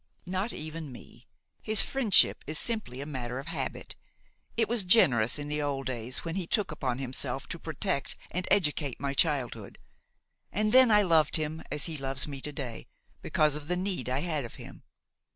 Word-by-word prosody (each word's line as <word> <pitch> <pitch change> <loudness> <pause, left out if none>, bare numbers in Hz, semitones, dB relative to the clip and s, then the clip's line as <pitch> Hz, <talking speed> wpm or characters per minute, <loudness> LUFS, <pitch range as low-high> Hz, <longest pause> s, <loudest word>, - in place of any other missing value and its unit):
"Not 190 +5 -2
even 155 -1 -6
me. 125 - -14 0.3
His 215 -1 +5
friendship 245 -8 +4
is 155 +1 0
simply 215 - +2
a - - -5
matter 125 -4 -5
of 135 - -6
habit; 165 +1 -5 0.6
it 225 -2 +2
was 235 -3 +1
generous 135 - +5
in 145 0 -4
the 150 0 -1
old 140 -2 -2
days 125 +2 -4
when 165 - -3
he 180 -2 -3
took 205 -3 +1
upon 130 -5 -2
himself 135 0 -2
to 170 - -5
protect 160 -2 -2 0.2
and 180 +1 -2
educate 150 -8 +1
my 140 0 -2
childhood, 130 - 0 0.7
and 215 +1 0
then 255 0 +7
I 210 -1 +5
loved 160 -5 +3
him 155 0 -1
as 145 - -1
he 160 -2 -3
loves 135 0 -2
me 140 -2 -7
to 150 - -3
day 130 -5 -6 0.3
because 155 -1 +2
of 150 -1 -7
the 180 +1 0
need 180 - -1
I 130 +2 0
had 155 -4 -2
of 115 - -9
him. - - -11
150 Hz, 190 wpm, -29 LUFS, 135-185 Hz, 0.7 s, then